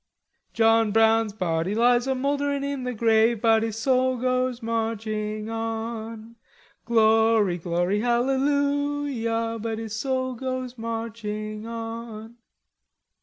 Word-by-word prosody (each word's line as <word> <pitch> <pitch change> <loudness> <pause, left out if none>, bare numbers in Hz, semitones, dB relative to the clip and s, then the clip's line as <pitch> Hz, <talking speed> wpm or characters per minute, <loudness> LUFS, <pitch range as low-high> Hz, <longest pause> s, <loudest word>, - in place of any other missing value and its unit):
"John 225 -1 +3
Brown's 225 0 +3
body 180 -1 -1
lies 240 +2 +3
a 265 - +1
mouldering 280 +1 -1
in 280 -2 -3
the 250 - -2
grave, 225 0 +3
But 225 0 +4
his 225 -1 -3
soul 255 +2 +2
goes 255 0 -1
marching 215 -2 -2
on. 225 0 -5 0.5
Glory, 220 -4 +3
glory, 175 +4 0
hallelujah! 265 -2 0
But 225 0 -3
his 220 -1 -5
soul 260 +2 -1
goes 255 0 -4
marching 225 -2 -5
on." 230 0 -7
225 Hz, 110 wpm, -25 LUFS, 220-255 Hz, 0.5 s, But